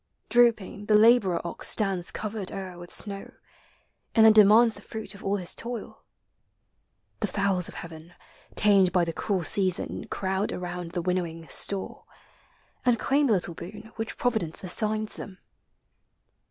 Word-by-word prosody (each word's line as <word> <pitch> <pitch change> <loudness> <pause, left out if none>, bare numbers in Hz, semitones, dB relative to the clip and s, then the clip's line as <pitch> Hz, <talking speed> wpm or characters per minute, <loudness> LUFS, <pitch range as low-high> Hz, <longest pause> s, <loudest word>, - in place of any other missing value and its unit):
Drooping, 220 -4 +1
the 215 - +4
laborer 210 -5 +4
ox 170 - 0
Stands 195 -5 +2
covered 210 -3 -4
o'er 185 -2 -7
with 175 0 -11
snow, 200 -2 -4 0.8
and 220 -2 +6
then 220 - +8
demands 215 +2 +6
The - - -13
fruit 220 -1 -6
of 200 - -13
all 195 +1 0
his 180 -3 -4
toil. 235 -2 -7 1.2
The 210 - -1
fowls 195 -2 +1
of - - -11
heaven, 165 +1 -10 0.4
Tamed 195 -3 +4
by 180 -2 +2
the 165 - -4
cruel 190 +1 -2
season, 185 +2 +2
crowd 190 +1 -2
around 180 -1 -6
The 175 - -3
winnowing 170 -2 -3
store, 195 -1 +1 0.8
and 245 -2 +2
claim 280 +5 +1
Hie 220 - +3
lit 180 - -1
lie 170 - -7
boon 210 +6 -11
Which 225 0 -5
Providence 220 -11 -1
assigns 215 +3 +1
them. 190 -2 -9
195 Hz, 155 wpm, -26 LUFS, 180-220 Hz, 1.2 s, then